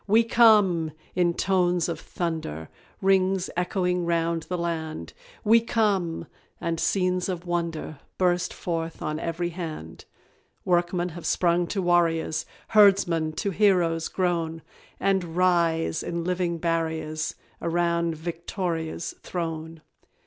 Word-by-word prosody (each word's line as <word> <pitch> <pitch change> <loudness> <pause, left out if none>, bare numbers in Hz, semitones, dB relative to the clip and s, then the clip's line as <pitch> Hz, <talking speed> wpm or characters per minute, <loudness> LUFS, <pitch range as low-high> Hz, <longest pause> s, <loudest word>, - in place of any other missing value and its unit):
"WE 220 +3 +5
COME!" 210 -9 +4 0.2
in 175 -1 +2
tones 180 -3 +2
of 170 - -3
thunder, 160 - -4 0.3
Rings 190 -1 +2
echoing 180 0 0
round 170 0 +1
the 180 - -1
land; 160 - -4 0.3
"We 225 +2 +6
come!" 205 -7 0 0.3
and 165 -1 -2
scenes 185 0 +1
of 180 -1 -4
wonder 170 -4 -3 0.2
Burst 180 -1 +1
forth 165 -1 -4
on 155 0 -2
every 170 +1 -2
hand. 155 - -7 0.6
Workmen 175 0 +1
have 170 0 -7
sprung 175 0 +2
to 195 0 -2
warriors, 165 -2 +1 0.2
Herdsmen 195 -7 +4
to 200 +5 -2
heroes 175 -5 +2
grown, 165 -3 -1 0.4
And 190 -4 0
rise, 170 -3 +2
in 170 0 -3
living 180 -1 -1
barriers, 160 -2 -2 0.3
Around 170 -1 0
VICTORIA'S 170 0 -4
throne. 160 -2 -5
170 Hz, 115 wpm, -26 LUFS, 165-180 Hz, 0.6 s, We